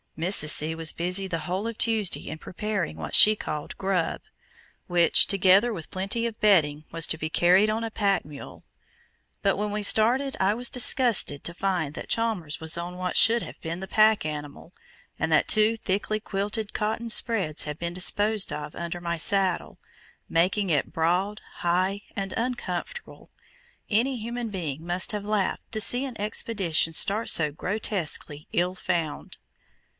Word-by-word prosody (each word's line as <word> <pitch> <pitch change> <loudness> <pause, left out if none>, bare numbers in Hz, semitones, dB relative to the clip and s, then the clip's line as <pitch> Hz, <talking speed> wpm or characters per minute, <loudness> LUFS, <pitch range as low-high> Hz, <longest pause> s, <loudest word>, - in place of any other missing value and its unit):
Mrs. 165 -2 +2
C. 155 +1 +3
was 160 -1 0
busy 180 +3 -1
the 165 -3 -4
whole 185 +5 -3
of 230 -1 -6
Tuesday 220 -5 +1
in 155 - -6
preparing 195 - -4
what 80 -2 -2
she 215 +1 +8
called 150 -7 -6
"grub," 190 -3 -2 0.7
which, 175 -2 +4
together 195 +4 +4
with 170 -8 -7
"plenty 200 +5 -3
of 230 -2 -5
bedding," 155 -8 +2
was 165 -1 +3
to - - -3
be 155 - -3
carried 185 +6 +3
on 220 +1 -2
a 225 - -4
pack 200 -3 0
mule; 145 -2 -11 0.8
but 195 - +1
when 210 +1 -2
we 210 +1 -2
started 245 +7 +4
I 190 +2 +2
was 245 +1 +1
disgusted 240 - +2
to 170 - -5
find 175 -5 -2
that - - -9
Chalmers 210 -10 -1
was 160 +1 +1
on 175 +1 -6
what 180 0 -4
should 230 +1 +5
have - - -10
been 165 +1 -5
the 190 - -7
pack 215 -3 +3
animal, 150 +2 -7 0.5
and 160 - -1
that 155 - +3
two 215 +1 +3
thickly 210 +1 -2
quilted 205 +1 -3
cotton 220 +2 -3
"spreads" 195 -9 +2
had 150 0 -6
been 170 0 -4
disposed 205 +3 +2
of 150 0 -6
under 170 0 -5
my 170 -1 -3
saddle, 190 +1 +2 0.5
making 185 +4 0
it 145 - 0
broad, 180 +5 -1 0.2
high, 185 +3 -1
and 195 -1 -4
uncomfortable. 255 - -5 0.6
Any 245 +5 +1
human 235 +1 -5
being 165 -6 -5
must 175 +1 +1
have 205 -1 -4
laughed 210 -2 -2
to 220 -1 -1
see 245 +4 +2
an 255 -5 -8
expedition 200 -6 -1
start 210 +6 +1
so 150 -2 +3
grotesquely 170 -4 -2
"ill 180 +2 -1
found." 170 -5 -4
190 Hz, 165 wpm, -25 LUFS, 165-215 Hz, 0.8 s, she